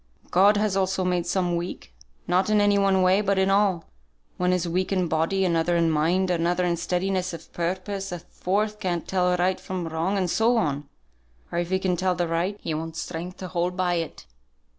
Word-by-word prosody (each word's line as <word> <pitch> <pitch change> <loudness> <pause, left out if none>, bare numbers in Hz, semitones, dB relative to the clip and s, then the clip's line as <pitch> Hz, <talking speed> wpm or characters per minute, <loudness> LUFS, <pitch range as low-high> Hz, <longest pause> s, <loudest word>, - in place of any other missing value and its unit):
God 200 +3 +5
has 210 -2 +1
also 190 -1 0
made 180 -1 0
some 175 -1 0
weak; 170 - -5 0.3
not 185 +3 +1
in 215 0 +4
any 205 0 +4
one 195 -1 +3
way, 185 +2 +4
but 200 -1 +1
in 190 0 +3
all. 195 -4 +2 0.5
One 180 0 +1
is 180 -1 0
weak 185 +3 -1
in 185 -2 +1
body, 165 +5 +1
another 170 0 +1
in 165 -1 +2
mind, 175 +5 +1
another 175 +1 +1
in 175 -1 +1
steadiness 185 +2 -1
of 165 -1 -10
purpose, 190 +3 -3
a 175 - -3
fourth 210 +5 -2
can't 180 -4 -2
tell 180 -1 +1
right 185 +1 +1
from 185 -3 -4
wrong, 165 +5 -1
and 185 -2 +1
so 230 +7 +2
on; 145 -6 -1 0.6
or 170 - -1
if 175 0 -2
he 190 - +2
can 185 -1 0
tell 185 0 +1
the 175 0 -1
right, 170 +5 -1
he 160 - -2
wants 160 +1 -4
strength 175 +3 -6
to 185 - -6
hold 180 0 -2
by 180 -1 +1
it. 165 -2 -4
180 Hz, 205 wpm, -25 LUFS, 170-190 Hz, 0.6 s, God